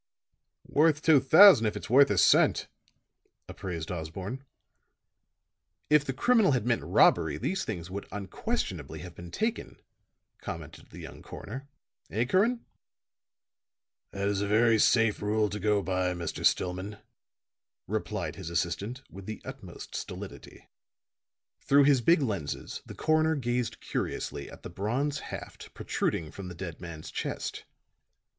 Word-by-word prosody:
"Worth 150 0 +3
two 155 -3 +6
thousand 155 - +8
if 105 - -2
it's - - -7
worth 135 +5 +6
a 105 - 0
cent," - - +4 0.8
appraised 85 -3 -6
Osborne. 90 - -5 1.5
"If 150 -1 +5
the 135 - -1
criminal 225 - +3
had 125 -4 0
meant 120 -1 +1
robbery 75 - +3
these 190 - -2
things 90 -5 -5
would 100 +1 -6
unquestionably 95 - -4
have 90 -1 -9
been 85 0 -10
taken," 225 - -3 0.6
commented - - -8
the - - -13
young - - -10
coroner. 135 +6 -8 0.4
"Eh, 115 +4 0
Curran?" 215 - +1 1.4
"That 100 0 -3
is 100 -1 0
a 100 - -1
very 110 +2 +4
safe 115 -3 +3
rule 105 0 +1
to 105 - -4
go 105 -2 +1
by, 90 -1 0
Mr. 85 -1 -5
Stillman," 95 +3 0 0.9
replied - - -3
his - - -6
assistant, 100 +9 -2
with 95 +2 -10
the 110 - -5
utmost - - -9
stolidity. - - -8 0.9
Through 140 +1 +4
his 140 -3 +4
big 165 +5 +4
lenses 100 - -4
the - - -9
coroner 155 0 +2
gazed 120 -3 -2
curiously 70 -1 -4
at - - -13
the - - -6
bronze 130 - -1
haft - - -9
protruding 80 -2 -2
from 100 -2 -8
the 90 - -8
dead 85 -2 -7
man's 85 -3 -8
chest. - - -4
105 Hz, 135 wpm, -29 LUFS, 90-140 Hz, 1.5 s, thousand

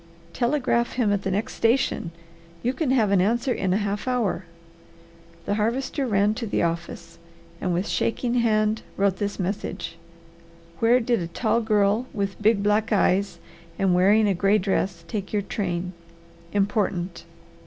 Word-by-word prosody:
"Telegraph 240 -2 +1
him 225 -5 +1
at 200 - 0
the 195 - -2
next 200 +4 -2
station. 230 -6 +1 0.5
You 250 +2 +1
can 295 0 -1
have 230 -6 +3
an 195 -2 +4
answer 240 +6 +1
in 190 -2 -1
a 190 - +3
half 205 +2 -2
hour." 225 -8 0 1.0
The - - 0
Harvester 250 +6 -1
ran 205 -1 +2
to 230 - -3
the 200 - 0
office, 170 0 -4 0.4
and 185 - 0
with 180 +4 -1
shaking 235 +1 -1
hand 215 -2 +2 0.2
wrote 195 -1 +2
this 205 +1 -3
message: 185 -3 -4 0.8
"Where 235 +2 +4
did 235 -1 +1
a 170 - -3
tall 220 +7 0
girl 215 +2 +2
with 200 -1 -3
big 210 -1 +3
black 210 +2 +1
eyes 200 -1 +2 0.4
and 195 -2 +2
wearing 205 +4 +4
a 200 - +3
gray 195 +3 +3
dress 185 -3 -1
take 195 +1 -4
your 205 -1 0
train? 180 -3 -3 0.6
Important." 195 -4 -1
205 Hz, 155 wpm, -24 LUFS, 190-230 Hz, 1.0 s, an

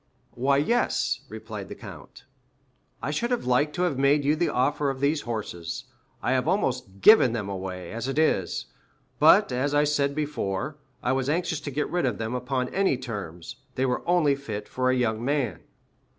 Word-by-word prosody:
"Why, 135 +3 +2
yes," 235 +12 +1
replied - - -7
the - - -7
count. - - -12 0.8
"I - - -1
should 235 - -1
have 245 -1 -1
liked 125 +4 +2
to 180 - 0
have 150 -7 0
made 140 +1 +3
you 150 +2 +3
the 170 +2 +1
offer 140 +3 +1
of 135 -1 -4
these 145 +2 +1
horses. 90 -7 -4 0.4
I - - +1
have 130 -1 +1
almost 125 - -1
given 215 - +7
them 105 -4 -3
away, 95 -2 -5
as 115 +3 -4
it 135 - -3
is; 155 - +1 0.5
but, - - +6
as 135 +4 0
I 145 - +5 0.2
before 145 -4 -3 0.3
said, - - -4
I - - +4
was 130 0 0
anxious 170 0 0
to 145 - -5
get 145 +2 -1
rid 175 -6 +1
of 115 -5 -1
them 115 +1 -3
upon 125 0 -2
any 190 -8 +2
terms. 100 -10 -7 0.2
They 130 - +1
were 125 - 0
only 170 -5 +4
fit 110 -7 -5
for 130 0 0
a 130 - +3
young 115 -2 0
man." 130 - 0
130 Hz, 190 wpm, -26 LUFS, 115-150 Hz, 0.8 s, given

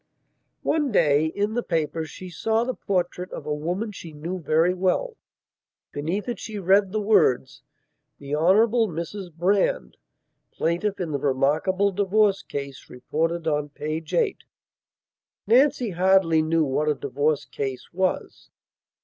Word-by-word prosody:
One 295 -4 +1
day, 155 -5 +3
in 205 +6 -2
the 240 - 0
papers, 160 -4 -2
she 185 - -9
saw 225 +7 0
the 255 +1 -2
portrait 180 -3 -2
of - - -7
a 150 - -1
woman 175 +9 -3
she 170 -5 -10
knew 170 +5 -5
very 165 +3 +2
well. 190 - 0 0.8
Beneath 170 +10 -3
it 240 - -3
she 220 -2 -6
read 195 +1 +3
the 215 - -1
words: 165 - +2 0.6
"The 140 +1 -7
Hon. 170 +5 +4 0.3
Mrs 175 +2 -6
Brand, 175 - 0 0.6
plaintiff 180 +5 -1
in 175 -4 -3
the 140 - -1
remarkable 150 +9 +1
divorce 200 +1 +2
case 140 -1 -7
reported 165 +6 -2
on 150 -1 0
p. 155 +2 -4
8." 430 -5 +1 1.1
Nancy 250 0 +3
hardly 180 -2 +3
knew 160 +1 +2
what 150 +3 0
a 150 - +2
divorce 145 +2 -1
case 135 +1 -5
was. 185 +1 -2
175 Hz, 140 wpm, -24 LUFS, 150-200 Hz, 1.1 s, Hon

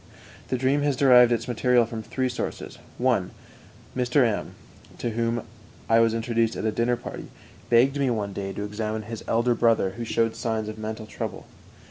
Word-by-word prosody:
The 130 - -1
dream 135 +3 +2
has 145 -1 +1
derived 125 -2 +6
its 120 +1 0
material 125 0 +3
from 115 -1 -6
three 130 +4 -2
sources: 125 - -5 0.2
1. - - +1 0.7
Mr. 125 +1 +3
M, 110 -3 -2 0.4
to 120 - -2
whom 115 +1 -1 0.4
I 115 0 +5
was 115 -1 +3
introduced 115 0 0
at - - -4
a 110 - +2
dinner 120 +2 +1
party, - - -8 0.4
begged 130 +4 +4
me 135 -2 +2
one 105 -4 -2
day 95 0 -4
to 100 - -5
examine 110 +1 -3
his 115 +1 -7
elder 120 +2 +2
brother, 115 -5 +2
who 115 +5 -6
showed 115 0 0
signs 110 -2 -2
of 110 0 -8
mental 110 0 -5
trouble. - - -6
115 Hz, 180 wpm, -25 LUFS, 110-125 Hz, 0.7 s, derived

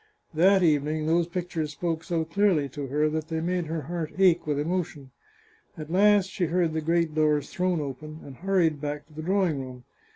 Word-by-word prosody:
That 190 +4 +4
evening 155 -1 +1
those 165 +1 +2
pictures 170 -4 -3
spoke 165 +1 -2
so 165 -3 -1
clearly 165 -3 +2
to 140 +1 -6
her 150 +3 +1
that 155 0 -3
they 160 -1 -2
made 175 0 -1
her 160 0 -3
heart 165 +1 -4
ache 180 -4 +4
with 145 -1 0
emotion. 155 -3 -3 0.7
At 155 0 -7
last 200 +1 +4
she 175 - -1
heard 170 -1 +1
the 160 - -1
great 165 0 +1
doors 150 -2 +1
thrown 180 -2 0
open, 155 +2 -6
and 135 -3 -11
hurried 170 -5 +1
back 150 0 -4
to 155 - -22
the 155 - -6
drawing 180 -3 +1
room. 130 -1 -9
160 Hz, 195 wpm, -26 LUFS, 150-175 Hz, 0.7 s, That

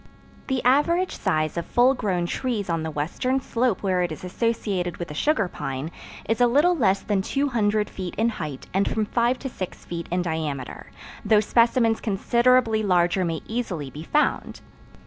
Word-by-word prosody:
The 265 -2 -1
average 335 +8 +2
size 155 -4 -1
of 170 - -2
full 250 +2 +4
grown 185 -8 -1
trees 210 -1 -2
on 165 -1 0
the 160 - -3
western 175 - -1
slope 240 -5 -1
where 185 -2 +1
it 175 -2 -1
is 155 - -7
associated 190 -3 -2
with 175 - -5
the - - -6
sugar 255 - +1
pine, 135 -1 -5 0.4
is 225 +2 0
a 245 - +6
little 295 +9 +4
less 195 - +2
than 200 -2 0
200 215 -4 0
feet 185 -2 -6
in 225 +2 +2
height 150 - -6
and 195 +2 +2
from 220 -1 0
five 240 +3 +1
to 270 - -6
six 190 -8 -7
feet 170 -1 -5
in 180 +1 0
diameter, 155 -6 -4 0.4
though 210 0 +4
specimens 230 +1 +2
considerably 235 +2 +2
larger 180 -2 +2
may 165 -2 -2
easily 185 - -4
be 150 - -8
found. 300 - 0
205 Hz, 175 wpm, -24 LUFS, 175-240 Hz, 0.4 s, a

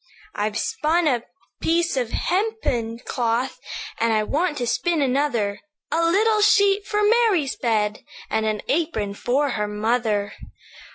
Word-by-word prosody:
"'I've 210 +1 -2
spun 320 +7 0
a 245 -5 +2 0.4
piece 335 -1 +1
of 250 -4 -1
hempen 350 - -1
cloth, 240 +2 -1 0.4
And 230 0 +2
I 215 -1 +2
want 300 +7 -1
to 245 - -1
spin 330 +8 0
another; 250 -7 0 0.3
A 335 - +1
little 425 +6 +3
sheet 405 -1 +4
for 420 0 0
Mary's 415 - +3
bed, 215 -3 0 0.3
And 220 0 0
an 215 -1 -2
apron 275 -11 -1
for 270 +7 0
her 210 -1 -1
mother. 210 -1 0
260 Hz, 135 wpm, -23 LUFS, 220-345 Hz, 0.4 s, sheet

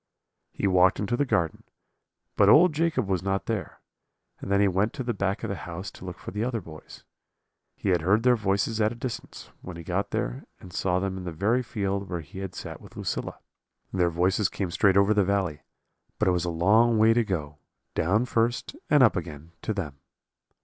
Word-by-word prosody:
"He - - -4
walked 95 -1 +4
into 105 +3 0
the 145 - +1
garden, 85 -9 0 0.7
but - - +5
old 170 +2 +7
Jacob 155 -8 0
was 95 -3 0
not 95 +1 -1
there, 110 -4 -4 0.6
and 95 - -6
then 100 - +4
he 100 - +4
went 95 +4 +1
to 130 - -4
the 120 -1 -1
back 100 0 -2
of 110 - -2
the - - -2
house 90 +3 -7
to - - -13
look 90 -1 -6
for - - -8
the 105 +2 -2
other 120 -1 -1
boys. 80 -5 -12 0.7
He 100 - -3
had 90 -3 +3
heard 100 +7 +2
their 125 0 +5
voices 105 +1 0
at 105 +1 +3
a - - -6
distance, 120 0 -7
when 90 -2 -8
he 85 - -8
got 90 +4 -2
there, - - -3
and 90 - -13
saw 90 0 0
them 95 0 -2
in - - -7
the 90 - -4
very 105 +10 +1
field 100 -4 -3
where 85 -2 -3
he 80 +5 -10
had 95 -2 -6
sat - - -7
with - - -14
Lucilla. - - -3 0.6
Their 90 -2 +2
voices 90 +4 +1
came 95 -4 -3
straight 95 +2 +3
over 100 +2 +5
the 105 -1 +3
valley; 95 -6 -1 0.6
but - - +1
it - - +5
was 90 -1 0
a - - -1
long 105 +8 +4
way 110 +1 +5
to 120 +1 +3
go, 75 -8 -4 0.3
down 105 +9 +2
first 120 - 0
and 145 -3 +6
up 115 - +5
again, 80 -2 -6
to - - -2
them. 80 -10 -4
100 Hz, 215 wpm, -26 LUFS, 90-110 Hz, 0.7 s, old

